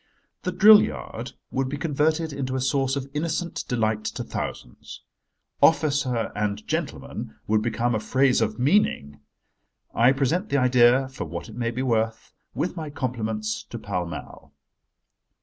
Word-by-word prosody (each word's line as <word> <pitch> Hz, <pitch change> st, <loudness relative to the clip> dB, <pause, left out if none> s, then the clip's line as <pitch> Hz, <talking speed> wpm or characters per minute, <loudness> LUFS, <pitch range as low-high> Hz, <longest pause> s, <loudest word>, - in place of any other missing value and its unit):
The 180 Hz, -, -2 dB
drill 210 Hz, +3 st, +8 dB
yard 65 Hz, -5 st, -5 dB, 0.2 s
would 130 Hz, 0 st, -1 dB
be 145 Hz, -, -3 dB
converted 155 Hz, +1 st, 0 dB
into 130 Hz, -2 st, -3 dB
a -, -, 0 dB
source 135 Hz, +1 st, +1 dB
of 135 Hz, -1 st, -4 dB
innocent 165 Hz, +3 st, -2 dB
delight 110 Hz, -3 st, 0 dB
to -, -, -3 dB
thousands. -, -, -7 dB, 0.6 s
"Officer 140 Hz, -7 st, +2 dB
and 105 Hz, 0 st, -2 dB
gentleman" -, -, -4 dB
would 110 Hz, 0 st, +2 dB
become 120 Hz, +1 st, 0 dB
a 110 Hz, -, +1 dB
phrase 130 Hz, +3 st, +2 dB
of 110 Hz, -1 st, 0 dB
meaning. 120 Hz, -, +1 dB, 0.7 s
I 120 Hz, +3 st, +5 dB
present 150 Hz, -, 0 dB
the 140 Hz, -, +2 dB
idea, 125 Hz, 0 st, +4 dB
for 130 Hz, -, -6 dB
what 85 Hz, +6 st, -7 dB
it 110 Hz, -, -10 dB
may 120 Hz, -1 st, -1 dB
be 125 Hz, +2 st, -3 dB
worth, 110 Hz, -3 st, -1 dB, 0.2 s
with 180 Hz, -, -2 dB
my 160 Hz, -3 st, -5 dB
compliments, 110 Hz, -6 st, -3 dB
to 120 Hz, -, -6 dB
Pall 90 Hz, -5 st, -3 dB
Mall. 85 Hz, -, -9 dB
125 Hz, 150 wpm, -25 LUFS, 110-145 Hz, 0.7 s, drill